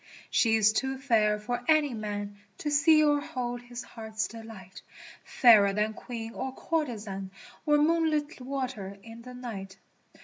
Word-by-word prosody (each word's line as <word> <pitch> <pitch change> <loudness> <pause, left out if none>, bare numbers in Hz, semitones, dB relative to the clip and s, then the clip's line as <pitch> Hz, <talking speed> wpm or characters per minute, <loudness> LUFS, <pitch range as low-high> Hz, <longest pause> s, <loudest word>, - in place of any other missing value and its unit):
' - - -19
She 225 -2 +3
is 215 -1 +4
too 265 +3 -1
fair 220 -6 +2
for 245 +3 -4
any 305 -4 +4
man 205 -2 -5
' 195 - -39
To 295 - -3
see 310 +1 +5
or 290 -1 +3
hold 245 -3 -4
his 245 0 -8
heart's 220 -1 -4
delight, 220 -5 -11 0.6
lFairer 205 -5 +7
than 210 +1 0
Queen 230 -1 -7
or 265 0 -5
courtezan 215 - -3 0.2
| - - -22
Or 295 0 +5
moonlit 310 -1 +1
water 250 -7 -4
in 230 0 -11
the 250 +1 -10
night. 195 -6 -7
235 Hz, 165 wpm, -28 LUFS, 210-275 Hz, 0.6 s, lFairer